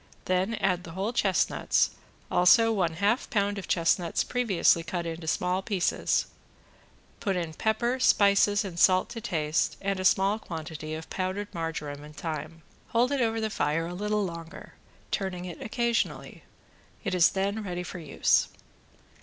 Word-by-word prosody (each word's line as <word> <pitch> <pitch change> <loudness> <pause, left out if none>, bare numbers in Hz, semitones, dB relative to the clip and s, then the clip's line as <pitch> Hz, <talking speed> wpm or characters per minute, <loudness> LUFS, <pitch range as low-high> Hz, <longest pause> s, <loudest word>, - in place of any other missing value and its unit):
Then 185 +5 +1
add 190 -4 0
the 165 - -9
whole 195 +6 -2
chestnuts, 195 -7 +2 0.4
also 225 +6 +5
one 180 -6 0
half 205 +8 0
pound 205 -1 0
of 190 - -8
chestnuts 170 0 +1
previously 210 -9 +2
cut 175 +1 -3
out 165 - -2
into 165 0 -9
small 180 +3 0
pieces, 190 -3 0 0.9
put 195 -3 -1
in 170 -3 -3
pepper, 235 +6 0
spices 205 -3 +4
and 175 -3 -6
salt 185 +1 +4
to 235 -1 -7
taste, 160 -8 0
and 195 -1 -2
a - - -2
small 195 +3 +3
quantity 160 -4 -6
of 160 +1 -8
powdered 190 +2 -3
margoram 160 -4 -4
and 150 0 -13
thyme. 160 0 -5 0.2
Hold 240 +3 +2
it 280 -2 +1
over 225 -1 +1
the 220 -1 -2
fire 160 -2 0
a 175 - -5
little 210 +2 -1
longer, 170 -2 -8 0.4
turning 185 -2 -2
it 175 -2 -8
occasionally. 235 +1 -2 0.6
It 195 - -2
is 180 -2 +5
then 200 +3 -1
ready 180 -3 -4
for 180 0 -7
use. 155 -4 +2
185 Hz, 160 wpm, -28 LUFS, 165-210 Hz, 0.9 s, also